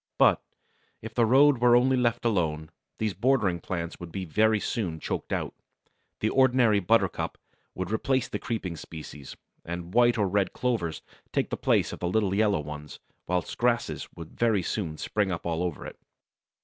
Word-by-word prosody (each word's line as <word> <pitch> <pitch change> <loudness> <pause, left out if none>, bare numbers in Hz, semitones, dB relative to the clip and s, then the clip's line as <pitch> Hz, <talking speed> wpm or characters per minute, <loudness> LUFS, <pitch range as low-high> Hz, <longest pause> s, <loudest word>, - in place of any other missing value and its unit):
But, - - +5 0.6
if - - -7
the 115 -2 +3
road 135 +2 +5
were 120 0 +5
only 130 +2 +4
left 120 -2 0
alone, 80 -8 0 0.3
these 110 -2 -1
bordering 100 -3 +1
plants 85 -1 -5
would 85 -1 -8
be 95 +2 -4
very 110 +5 +2
soon 90 -7 -2
choked - - -4
out. - - -2 0.7
The 110 - +1
ordinary 125 -5 +4
buttercup 110 +5 +1 0.4
would 95 +1 -4
replace 130 +3 +1
the - - -4
creeping 95 -8 -4
species, 75 -4 -9 0.3
and 85 +1 -6
white 120 -1 +4
or 105 -2 +2
red 95 0 0
clovers 110 -11 -2 0.3
take - - -1
the - - 0
place - - +1
of - - -7
the 90 - -1
little 100 0 +1
yellow 105 -4 +2
ones, 75 0 -8 0.3
whilst 90 -1 -2
grasses 120 0 0
would 85 -1 -9
very 110 -5 +1
soon 85 -5 -3
spring 105 +2 -1
up 85 - -4
all 85 -1 -1
over 90 -4 -3
it. - - -9
100 Hz, 175 wpm, -27 LUFS, 85-120 Hz, 0.7 s, But